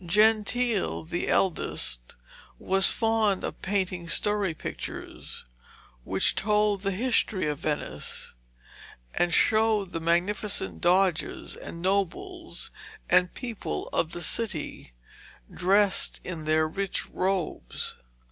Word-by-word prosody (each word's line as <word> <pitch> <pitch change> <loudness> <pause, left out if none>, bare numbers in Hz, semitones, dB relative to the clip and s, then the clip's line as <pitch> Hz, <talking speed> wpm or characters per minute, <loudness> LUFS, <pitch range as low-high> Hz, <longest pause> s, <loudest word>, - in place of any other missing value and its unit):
Gentile, 215 +4 +2
the 170 +2 -3
eldest, 60 - 0 0.4
was 195 0 +4
fond 225 -4 +1
of - - -5
painting 185 -3 -1
story 200 +2 +1
pictures, - - -7 0.6
which 95 +6 +2
told 210 -1 +2
the 195 - 0
history 215 -2 +1
of 150 -1 -2
Venice, 150 - -3 0.8
and 175 0 +1
showed 215 -1 +3
the 165 - -3
magnificent 170 - 0
doges, 180 -2 +1
and 170 +1 -8
nobles, 330 - -1 0.4
and 180 0 +4
people 225 - -4
of 160 - 0
the 175 - -4
city, 170 - -1 0.6
dressed 195 +2 +3
in 165 -4 -6
their 155 0 +3
rich 195 +4 -2
robes. 185 -2 -2
190 Hz, 105 wpm, -27 LUFS, 170-210 Hz, 0.8 s, was